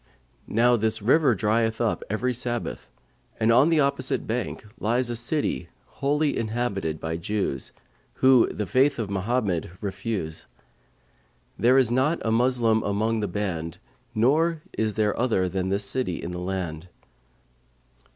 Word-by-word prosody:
Now 120 +2 +3
this 110 0 0
river 130 +3 +4
drieth 110 +1 +1
up 115 -3 0
every 125 +5 0
Sabbath,[FN#542] 120 0 -6
and 110 +1 +3
on 130 +7 +5
the 160 -2 +4
opposite 140 0 0
bank 115 -1 -3
lies 120 +3 +1
a - - -2
city 120 - -1 0.2
wholly 145 +2 0
inhabited 110 -8 -2
by 80 0 -3
Jews, 85 -7 -2 0.4
who 130 -2 +5
the 105 - -3
faith 135 +9 +2
of 110 -4 -3
Mohammed 100 -4 -1
refuse; 100 -5 -4 1.1
there 125 +3 +4
is 125 -4 +3
not 135 +7 +2
a 110 - +1
Moslem 115 -1 +3
among 110 +3 0
the 105 - -1
band 85 -5 -3 0.4
nor 155 +8 +2
is 110 -1 -1
there 105 -1 +1
other 110 -7 +1
than 95 0 -2
this 100 +1 0
city 100 -4 -1
in 85 - -5
the 90 - -5
land. 90 -3 -4
110 Hz, 140 wpm, -25 LUFS, 100-125 Hz, 1.1 s, on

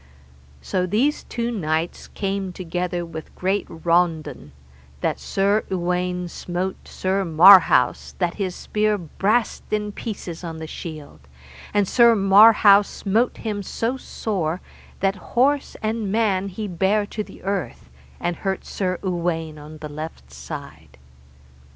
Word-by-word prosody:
So 185 -1 -1
these 250 +11 +1
two 235 0 -3
knights 160 -5 -2
came 195 -2 -3
together 175 0 -3
with 160 -2 -9
great 190 +2 -1
raundon, 165 - 0 0.5
that - - -1
Sir 200 +2 +1
Uwaine 180 0 -1
smote 180 +2 -4
Sir 190 +1 -1
Marhaus 180 +2 +6
that 175 -2 0
his 185 -2 -2
spear 215 0 0
brast 200 +7 0
in 210 -1 -1
pieces 185 -6 -6
on 165 -2 -5
the 160 - -6
shield, 155 -2 -8 0.5
and 205 -2 +2
Sir 235 +1 +5
Marhaus 205 0 +7
smote 220 +5 0
him 210 -3 -3
so 230 +5 -2
sore 185 -10 -3 0.4
that 195 +1 +1 0.2
horse 280 +3 +2
and 215 -2 -1
man 200 -3 +1
he 210 +3 -5
bare 195 +3 +1
to 215 +1 -4
the - - -14
earth, 190 - -4 0.3
and 175 -1 -2
hurt 190 -1 -3
Sir 185 -2 -2
Uwaine 165 -4 -2
on 150 +1 -11
the 155 - -5
left 145 - -8
side. 70 +2 -9
185 Hz, 130 wpm, -22 LUFS, 170-205 Hz, 0.5 s, Marhaus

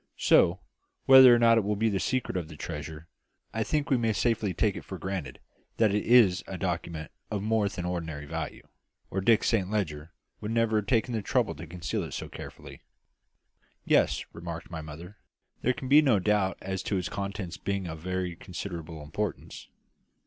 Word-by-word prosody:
"So, 85 +2 +4 0.5
whether 130 -1 +10
or 120 - +7
not 115 -1 +5
it - - -1
will 105 +1 0
be 110 +2 +1
the 100 -3 0
secret 130 -1 -1
of 90 -4 -2
the 75 - -11
treasure, 80 0 -7 0.5
I 110 - -1
think 150 +4 -1
we 130 - +5
may 115 -2 +1
safely 110 -2 +1
take 105 +2 +1
it - - -7
for 95 - -7
granted 95 -2 -5 0.4
that 110 -3 +3
it 105 - +1
is 110 -7 +5
a 95 - -5
document 85 -4 -3 0.2
of 100 -2 -3
more 110 -1 +1
than 90 -3 -5
ordinary 80 -4 -4
value, 70 - -6 0.4
or 95 - -1
Dick 110 +2 +4
Saint 100 -5 +1
Leger 85 -7 -2 0.3
would 105 - -5
never 115 -1 +2
have 105 - -1
taken 120 0 +1
the 110 - -1
trouble - - +1
to 85 - -9
conceal 85 -1 -3
it - - -6
so - - -5
carefully." - - -10 1.0
"Yes," - - +2
remarked 85 0 -7
my 80 -2 -5
mother, 80 +6 -10 0.4
"there 125 - +2
can 130 - -7
be 145 +3 +7
no 130 -8 +4
doubt 100 0 +1
as 95 0 -3
to 100 +1 -1
its 90 - -2
contents 100 -4 -5
being 100 -1 -2
of 80 -2 -6
very 90 0 -3
considerable 85 -3 -7
importance. 95 +7 -5
95 Hz, 190 wpm, -28 LUFS, 85-110 Hz, 1.0 s, whether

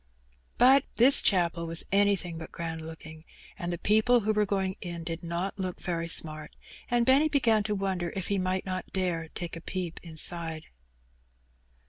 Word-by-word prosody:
But 265 +3 +6
his 265 +4 +7
chapel 170 -3 +1
was 165 0 +4
anything 195 -4 +1
but 160 - -9
grand 165 -1 -5
looking, 160 0 -11 0.3
and 175 0 -5
the 175 - -3
people 220 +6 +3
A6 215 +1 -1
were 210 0 +2
going 190 -1 -1
in 170 -2 -6
did 165 0 -5
not 175 +4 -4
look 185 -2 -4
very 170 -2 -3
smart, 155 -2 +3 0.3
and 240 -1 +1
Benny 275 +5 +4
began 230 -7 +2
o 210 - 0
wonder 190 -3 -2
if 190 -2 -3
he 200 -1 0
might 185 0 -2
not 185 -1 -5
dare 175 -4 -2
take 170 +1 -7
a 165 - -9
peep 180 -1 -5
inside. 165 -1 -1
180 Hz, 170 wpm, -28 LUFS, 165-205 Hz, 0.3 s, his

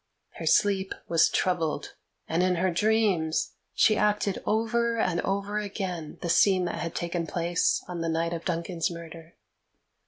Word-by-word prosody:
Her - - -5
sleep 195 -2 +2
was 165 -1 +4
troubled, 165 -5 -1 0.3
and 165 +2 +1
in 185 0 +2
her 180 +2 +1
dreams 195 -5 +1 0.2
she 215 - +5
acted 210 -2 +1
over 230 +1 +1
and 180 -5 +1
over 200 +2 -1
again 190 -6 -5
the - - -1
scene 185 +1 +4
that - - -3
had 165 -1 -4
taken 170 -1 -2
place 170 +1 0
on 175 -2 -5
the 165 - -1
night 165 +1 0
of 170 0 -5
Duncan's 170 -1 -1
murder. 165 -1 -10
180 Hz, 155 wpm, -27 LUFS, 165-200 Hz, 0.3 s, she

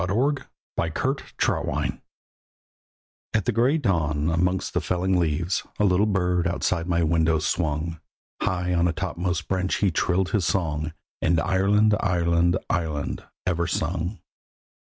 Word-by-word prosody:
A 90 - -1
BIRD 135 +9 0 0.9
FROM - - +1
THE - - 0
WEST - - -1 1.4
At 110 - +1
the - - +2
grey 120 +7 +3
dawn, 80 - +1
amongst 90 +3 0
the - - +1
felling 90 +1 +1
leaves, 85 +2 0 0.2
A - - +1
little 100 +2 +3
bird 90 -3 +1
outside 85 0 -1
my 85 -1 +2
window 80 0 +3
swung, 80 0 -1 0.4
High 90 -3 0
on 85 0 +3
a 85 - 0
topmost 90 -2 -2
branch 95 -1 0
he 100 -3 +2
trilled 90 +3 +1
his 100 -5 +1
song, 80 -4 -1 0.3
And 85 0 +3
"Ireland! 100 +4 +3
Ireland! 85 -1 +2
Ireland!" 80 -5 -2 0.2
ever 85 -1 0
sung. 85 +3 -2
90 Hz, 140 wpm, -25 LUFS, 85-95 Hz, 1.4 s, grey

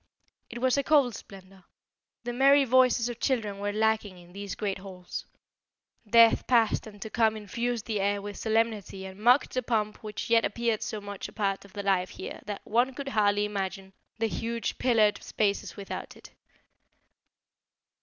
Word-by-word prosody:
It 240 - -7
was 255 +1 +2
a - - 0
cold 280 -6 +4
splendour. 190 -2 -12 0.6
The 240 0 -4
merry 275 +2 +5
voices 255 -1 +4
of 240 -2 -6
children 215 -7 -1
were 205 0 -1
lacking 215 -2 0
in 175 0 -16
these 200 -1 -6
great 200 -3 -3
halls. 185 -2 -8 0.8
Death 230 +1 +6
past 230 -3 +3
and 205 -1 -12
to 220 - -8
come 220 -2 +2
infused 235 +3 -3
the 215 -3 -2
air 200 +1 +1
with 205 0 -7
solemnity 220 -4 -1
and 190 +1 -10
mocked 245 +5 +4
the 255 - 0
pomp 215 -3 -1
which 210 -2 -6
yet 230 -1 +4
appeared 230 0 -1
so 215 - -4
much 200 -1 -6
a - - -13
part 200 -2 -1
of 195 - -17
the 200 - -5
life 185 -2 +1
here - - -8
that 205 -1 -5
one 245 +4 +1
could 275 0 -5
hardly 205 -3 +2
imagine 195 -1 -4 0.2
the 225 - 0
huge 230 0 -3
pillared 220 -5 +3
spaces 200 -2 -1
without 200 -1 -7
it. - - -15
215 Hz, 175 wpm, -28 LUFS, 200-235 Hz, 0.8 s, Death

